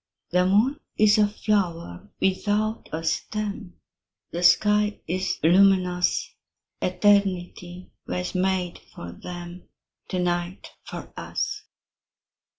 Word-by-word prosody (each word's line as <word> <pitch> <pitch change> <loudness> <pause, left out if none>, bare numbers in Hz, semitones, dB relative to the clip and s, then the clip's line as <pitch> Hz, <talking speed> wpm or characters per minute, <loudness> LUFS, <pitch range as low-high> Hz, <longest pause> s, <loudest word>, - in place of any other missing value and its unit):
The 180 +1 +3
moon 220 +9 +3 0.2
is 215 0 +5
a 210 - +5
flower 175 - -2
without 210 +3 0
a 160 +1 -4
stem, 200 +2 -3 0.6
The 170 - -3
sky 210 +4 +4
is 185 +3 -1
luminous; 180 0 +3 0.5
Eternity 180 -2 +1 0.2
was 180 0 -3
made 185 -1 0
for 85 - -10
them, 175 - -9 0.4
To 185 - -3
night 175 +1 -2
for - - -8
us. - - -4
185 Hz, 100 wpm, -25 LUFS, 175-205 Hz, 0.6 s, is